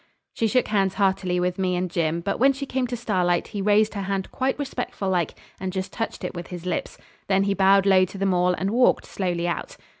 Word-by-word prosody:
She 225 - 0
shook 250 +3 +1
hands 195 -3 +1
heartily 190 -3 +1
with 180 +1 -1
me 185 -1 +1
and 180 +1 -1
Jim, 170 -1 -1
but 195 +3 -2
when 275 +3 +5
she 275 +1 -5
came 260 -1 -1
to 245 0 -4
Starlight 180 -6 0
he 205 -2 -4
raised 210 +2 +3
her 200 - -3
hand 195 0 -3
quite 265 +1 -1
respectful 255 -8 -3
like 175 -4 0 0.2
and 190 0 -3
just 190 0 -4
touched 225 - -4
it - - -3
with 175 -1 -7
his 180 -1 -8
lips. 180 - -3 0.3
Then 195 0 +3
he 200 0 +1
bowed 195 0 +4
low 190 -1 +5
to 190 +2 -10
them 195 -1 +1
all 180 0 +2
and 190 +2 -2
walked 245 +2 +3
slowly 175 -3 -2
out. - - -4
195 Hz, 235 wpm, -24 LUFS, 180-215 Hz, 0.3 s, when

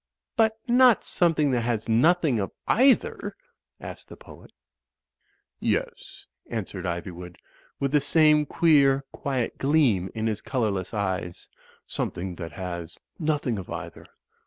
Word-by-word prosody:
"But 220 -2 +2
not 245 -1 +5
something 155 -5 +2
that 125 -2 +1
has 115 -2 -2
nothing 140 +2 +3
of 100 - -3 0.2
either?" 260 +2 +2 0.4
asked - - -9
the - - -11
poet. - - -15 1.1
"Yes," - - -3 0.2
answered 100 -5 -5
Ivywood, 85 0 -6 0.4
with 140 -1 -1
the 150 -1 +3
same 150 0 +4
queer, 140 -5 +4
quiet 130 -4 -3
gleam 135 - +2
in 110 0 -2
his 110 -1 -1
colourless 105 -8 -2
eyes, 95 -3 -3 0.4
"something 90 +1 -4
that 85 -4 -7
has 85 -2 -6 0.2
nothing 150 - -1
of 95 - -9
either." 85 0 -7
120 Hz, 125 wpm, -25 LUFS, 95-155 Hz, 1.1 s, not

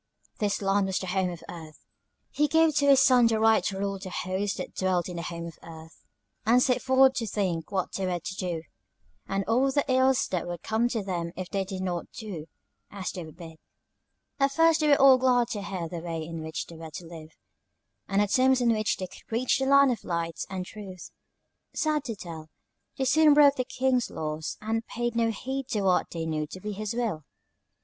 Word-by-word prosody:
This 205 -1 -1
land 195 0 +2
was 190 - -1
the - - -3
Home 185 0 0
of 175 -2 -8
Earth. 160 -3 -11 0.5
He 300 +2 +2
gave 320 0 +3
to 285 -1 +3
his 275 -1 +7
Son 250 -3 +6
the 225 -1 +1
right 220 0 +4
to 195 - -2
rule 195 0 -2
the 190 0 -7
host 190 +2 -2
that - - -6
dwelt 185 -2 0
in 180 -2 -6
the - - -3
Home 170 0 -5
of 165 -2 -10
Earth, 160 -1 -13 0.4
and 235 +3 +4
set 250 -1 +2
forth 260 0 +5
to 230 - -1
think 185 -6 -2
what 190 -2 -1
they 190 -1 -2
were 180 -1 -1
to 190 +3 -6
do, 175 -4 -3 0.6
and 195 0 -1
all 250 +5 +2
the 285 +1 +1
ills 260 0 +3
that 180 -2 -2
would 175 -1 -6
come 225 +2 +1
to 225 -4 -2
them 175 -3 -3
if 185 0 -6
they 195 -1 0
did 190 -1 -5
not 175 -2 -3
do 185 -8 -7 0.4
as 195 -2 -5
they 180 - -6
were 160 - -10
bid. 165 -1 -12 0.8
"At 275 0 +2
first 330 +1 +4
they 305 - +2
were 285 -1 +5
all 270 -1 +7
glad 250 -2 +3
to 210 -4 -3
hear 185 -4 -4
the 170 +1 -6
way 165 -1 -4
in 165 0 -6
which 160 0 -4
they 165 - -12
were 160 0 -8
to 170 +3 -8
live, 160 -2 -11 0.7
and 200 +1 +2
the - - 0
terms 260 +4 +3
on 245 -1 +2
which 215 -1 0
they 185 - -4
could 185 - -15
reach 240 +4 +1
the 265 - 0
Land 280 -1 +6
of 230 - -4
Light 170 -1 -3
and 185 -1 -4
Truth. 190 -3 -10 0.6
Sad 305 -2 0
to 230 -4 -4
tell, 165 -5 -9 0.5
they 265 - 0
soon 305 +2 +5
broke 285 -1 +7
the 255 - -1
King's 255 -1 0
laws, 155 0 -4
and 225 +1 -1
paid 240 0 -3
no 230 -1 +2
heed 265 +4 -4
to 215 -6 -1
what 185 -2 +2
they 165 -1 -4
knew 155 -1 -2
to 185 - -9
be 210 +3 -5
his 210 +2 -4
will. 225 -11 -2
200 Hz, 225 wpm, -27 LUFS, 175-250 Hz, 0.8 s, his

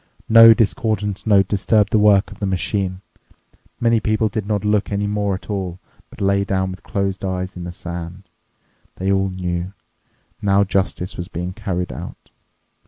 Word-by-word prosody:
No 115 0 +9
discordant 110 -3 -1
note 100 -3 +5
disturbed 105 +1 +2
the 110 - +5
work 105 -1 +4
of 105 - -12
the 100 - -1
machine. 95 0 -1 0.8
Many 115 -1 +3
people 110 0 +1
did 105 0 -4
not 105 -1 -1
look 105 -1 +1
any 100 0 -1
more 100 -1 -1
at 95 - -10
all, 95 -4 -4 0.3
but - - -15
lay 100 0 +2
down 95 -1 -1
with 95 - -9
closed 100 -1 -3
eyes 95 -1 -3
in 90 -1 -6
the 90 - -5
sand. 85 +1 -7 0.7
They 95 +1 -1
all 95 0 +1
knew: 90 0 -4 0.7
now 100 -1 +3
justice 95 -2 -2
was 85 - -5
being 90 -1 -5
carried 90 -2 -3
out. - - -9
100 Hz, 170 wpm, -20 LUFS, 95-105 Hz, 0.8 s, No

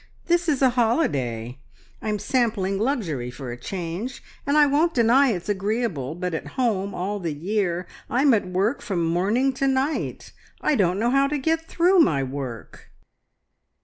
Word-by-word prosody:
"This 345 -1 +2
is 280 -3 +1
a 260 - +5
holiday. 135 - 0 0.4
I'm 215 -1 -1
sampling 205 -5 0
luxury 190 - -1
for 125 0 -7
a - - -5
change, 180 - -5 0.2
and 285 +2 +3
I 300 - +7
won't 305 +4 +2
deny 250 +3 +5
it's 180 -7 -3
agreeable, 200 - -1
but 180 0 -3
at 160 - -4
home 200 -6 0
all 200 +3 -2
the 165 -5 -3
year 180 +1 -1 0.2
I'm 265 +2 +4
at 210 -4 +1
work 195 +8 0
from 190 -8 -1
morning 205 +11 +1
to 275 +1 0
night. 270 +3 -1 0.3
I - - +1
don't 185 -7 +2
know 235 +4 +1
how 275 +1 +4
to 295 +1 -1
get 325 +3 -1
through 360 +2 +3
my 150 - +4
work." 130 -4 -7
210 Hz, 165 wpm, -24 LUFS, 170-265 Hz, 0.4 s, I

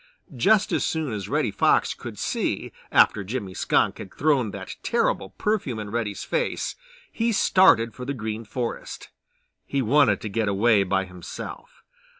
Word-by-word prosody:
Just 200 - +3
as - - +1
soon 155 -7 -1
as 100 -3 -5
Reddy - - +1
Fox - - +2
could - - -9
see - - -2 0.2
after 100 - +4
Jimmy 100 -2 -4
Skunk - - +1
had 95 - -8
thrown 140 -7 +1
that - - -8
terrible 95 - 0
perfume 200 - -1
in 105 -1 -6
Reddy's 110 -3 -3
face 485 0 -1 0.4
he 230 +1 0
started 185 - +4
for 125 - -8
the 140 +2 -3
Green 110 -1 -4
Forest. 115 +2 -5 0.5
He 140 -1 -1
wanted 125 -4 +4
to - - -4
get 110 +1 -1
away 100 +2 +3
by 95 0 0
himself. 90 -2 -9
115 Hz, 155 wpm, -25 LUFS, 100-140 Hz, 0.5 s, after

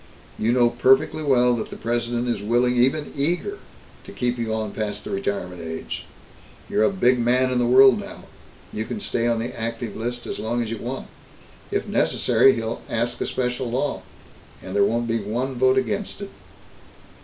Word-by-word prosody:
"You 110 +2 +2
know 120 -1 +4
perfectly 130 +5 +3
well 125 -4 +3
that 110 - -4
the - - -8
President 120 +1 -1
is 115 -4 -1
willing, 120 +4 +2
even 135 +5 +1
eager, 175 - -1 0.4
to - - -11
keep 125 -1 -2
you 115 -1 -2
on 110 -1 -2
past 105 -1 -4
the - - -7
retirement 90 -3 -3
age. 80 -1 -6 0.6
You're - - 0
a 110 - +5
big 120 +6 +2
man 125 +2 +2
in 125 - +1
the 120 - +2
world 130 +1 +7
now. - - -9 0.5
You 110 - -3
can 215 - -5
stay 120 - 0
on 120 -1 +2
the 115 +2 -3
active 115 -1 -4
list 120 +2 -4
as - - -5
long 120 +2 -1
as 110 - -5
you 115 - -4
want. 130 +3 -5 0.6
If - - -2
necessary, 135 - +3
he'll 115 0 -3
ask 120 +1 -1
a - - 0
special 125 -1 -2
law, 135 +4 -1 0.6
and 95 +1 -8
there 100 - +4
won't 115 +3 +1
be 115 0 0
one 120 +6 -2
vote 130 +1 +3
against 200 0 -2
it." 200 - -7
120 Hz, 190 wpm, -23 LUFS, 110-130 Hz, 0.6 s, world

